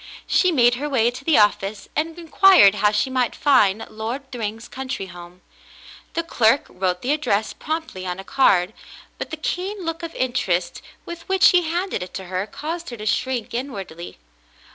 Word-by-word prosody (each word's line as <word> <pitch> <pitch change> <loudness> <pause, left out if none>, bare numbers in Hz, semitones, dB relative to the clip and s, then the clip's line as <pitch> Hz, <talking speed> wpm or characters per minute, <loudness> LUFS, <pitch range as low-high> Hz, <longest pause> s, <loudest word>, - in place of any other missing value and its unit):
She 365 - +3
made 240 -6 +4
her 295 - -2
way 240 -4 +2
to 255 +2 -10
the 320 0 +3
office 205 -1 +1
and 320 +2 -2
inquired 345 - +6
how 210 0 +2
she 210 +5 0
might 250 -3 0
find 225 -8 +3
Lord 240 +6 -6
Thryng's 225 -1 -5
country 260 -6 -5
home. 175 0 -12 0.7
The 335 - 0
clerk 240 -4 +2
wrote 180 -1 -2
the 255 - 0
address 220 -8 0
promptly 310 - -5
on 180 0 -3
a 195 - -8
card, 195 -6 +2 0.5
but - - -4
the 315 - -5
keen 370 +4 -3
look 330 +1 -3
of 335 -1 -7
interest 185 -9 -1 0.2
with 340 0 -9
which 380 -1 +6
he 355 -3 +2
handed 350 - -2
it 180 - -8
to 190 - -5
her 185 +2 -3
caused 330 +8 -6
her 240 - -7
to 215 - -7
shrink 245 +1 -1
in 260 +4 -3
wardly. 175 -5 -8
245 Hz, 185 wpm, -22 LUFS, 195-315 Hz, 0.7 s, inquired